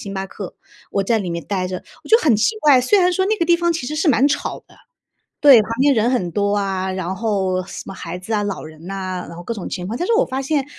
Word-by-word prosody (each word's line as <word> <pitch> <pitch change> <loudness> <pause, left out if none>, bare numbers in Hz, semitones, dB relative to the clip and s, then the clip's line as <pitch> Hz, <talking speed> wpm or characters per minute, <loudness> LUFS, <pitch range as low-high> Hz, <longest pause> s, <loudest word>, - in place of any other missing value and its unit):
星 200 -1 -7
巴 190 0 -3
克， 195 -1 -8 0.4
我 200 - +1
在 225 +3 +1
里 195 -4 -4
面 170 -3 -4
呆 185 0 -2
着 185 0 -5 0.2
我 - - -12
就 450 - +7
很 270 - +3
奇 335 - +1
怪。 285 -4 +6
虽 385 +11 +3
然 360 0 +3
说 375 +2 +1
那 435 +2 +1
个 335 - 0
地 345 0 +4
方 345 0 +1
其 315 -7 -4
实 305 - -4
是 320 +1 +1
蛮 265 +1 +4
吵 295 - -2
的， - - -19 0.7
对， 275 -6 +8
旁 215 - -9
边 280 0 +4
人 230 +2 +2
很 190 -9 0
多 205 0 +1
啊， 190 -2 -1
然 185 0 -3
后 190 -3 -1
什 - - -7
么 - - -7
孩 170 0 -6
子 185 +5 -7
啊， 210 - +1
老 205 -1 -4
人 155 +3 -11
啊， 185 -2 -4
然 170 - -10
后 175 - -8
各 205 - -4
种 200 - -6
情 180 -1 -5
况， 225 +4 -4
但 350 - -1
是 465 - +1
我 480 +3 +4
发 265 - -4
现 280 0 0
210 Hz, 305 characters per minute, -20 LUFS, 185-285 Hz, 0.7 s, 对